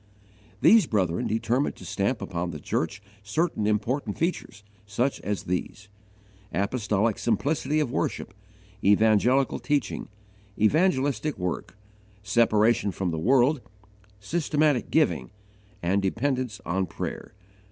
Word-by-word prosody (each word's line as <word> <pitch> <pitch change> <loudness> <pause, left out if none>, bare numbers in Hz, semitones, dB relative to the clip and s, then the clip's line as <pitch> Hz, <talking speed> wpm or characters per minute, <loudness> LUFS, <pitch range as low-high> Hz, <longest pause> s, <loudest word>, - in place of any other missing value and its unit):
These 225 -1 +6
brethren 90 -6 0
determined 115 +5 0
to - - -12
stamp 100 +2 -1
upon 90 -2 -3
the 75 -3 -6
church 100 +8 -2 0.2
certain 105 +1 -1
important 110 +2 -1
features 165 - -3 0.2
such 125 +7 -1
as 100 +1 -3
these: 95 +3 -4 0.6
Apostolic 105 +2 0
simplicity 140 +5 0
of 145 -6 0
worship, - - -2 0.5
evangelical 110 +6 +3
teaching, 145 -3 -1 0.5
evangelistic 145 - +2
work, 90 +2 -4 0.5
separation 110 +1 +3
from 90 +1 -2
the 80 - -3
world, 130 - +3 0.6
systematic 150 +1 +1
giving, 65 - +1 0.5
and 95 +4 +2
dependence 125 +2 -1
on 95 +2 -1
prayer. - - -6
110 Hz, 110 wpm, -26 LUFS, 100-135 Hz, 0.6 s, These